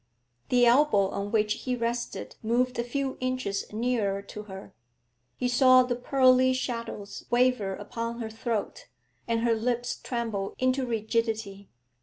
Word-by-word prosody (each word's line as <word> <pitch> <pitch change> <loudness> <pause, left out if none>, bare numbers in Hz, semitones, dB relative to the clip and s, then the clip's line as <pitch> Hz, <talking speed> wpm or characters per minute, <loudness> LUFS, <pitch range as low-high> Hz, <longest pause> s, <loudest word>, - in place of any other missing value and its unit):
The 245 -1 +5
elbow 235 -6 +4
on 200 +1 -4
which 210 -1 +2
he 255 +2 -3
rested 235 0 -3
moved 245 +2 0
a - - +1
few 265 +2 -3
inches 255 -6 -2
nearer 215 -3 -1
to 210 +1 -8
her. 195 -1 -10 0.6
He 250 - 0
saw 255 +1 +6
the 250 -1 -1
pearly 255 0 +4
shadows 230 -5 -5
waver 240 -5 +2
upon 230 +3 -5
her 220 -2 -4
throat, 225 - -3 0.4
and 230 -1 0
her 235 0 +3
lips 245 +2 -1
tremble 225 -5 -3
into 255 0 +1
rigidity. 220 -3 -2
235 Hz, 140 wpm, -27 LUFS, 215-250 Hz, 0.6 s, saw